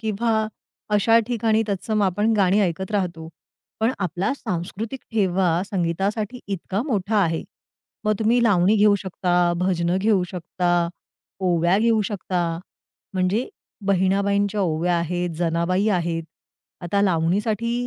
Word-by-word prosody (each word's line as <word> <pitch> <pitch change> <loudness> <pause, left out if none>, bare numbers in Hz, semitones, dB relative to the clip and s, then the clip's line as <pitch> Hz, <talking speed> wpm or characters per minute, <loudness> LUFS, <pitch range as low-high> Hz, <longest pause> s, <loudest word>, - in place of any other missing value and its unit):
किंवा 220 0 0 0.5
अशा 225 +3 +5
ठिकाणी 225 -2 +1
तत्सम 210 +2 -1
आपण 205 +4 +1
गाणी 195 +1 +3
ऐकत 190 +1 -1
राहतो. 175 -5 -2 0.5
पण 230 +3 +2
आपला 185 - -1
सांस्कृतिक 215 +4 -5
ठेवा 185 -4 +2
संगीतासाठी 200 +6 -1
इतका 195 +1 -3
मोठा 215 -3 0
आहे. 165 -2 0 0.6
मग 215 - +3
तुम्ही 235 +2 +3
लावणी 200 -1 +4
घेऊ 210 0 +5
शकता, 175 -2 +1
भजनं 180 -1 +1
घेऊ 200 -2 +2
शकता, 175 -1 0 0.5
ओव्या 175 +1 +2
घेऊ 225 0 +3
शकता. 175 -4 -2 0.6
म्हणजे 185 +6 0 0.4
बहिणाबाईंच्या 200 +2 +1
ओव्या 170 0 +1
आहेत, 175 +1 -2
जनाबाई 175 +4 +1
आहेत. 170 -4 0 0.6
आता 185 +3 0
लावणीसाठी 205 +6 +1
190 Hz, 120 wpm, -23 LUFS, 175-215 Hz, 0.6 s, अशा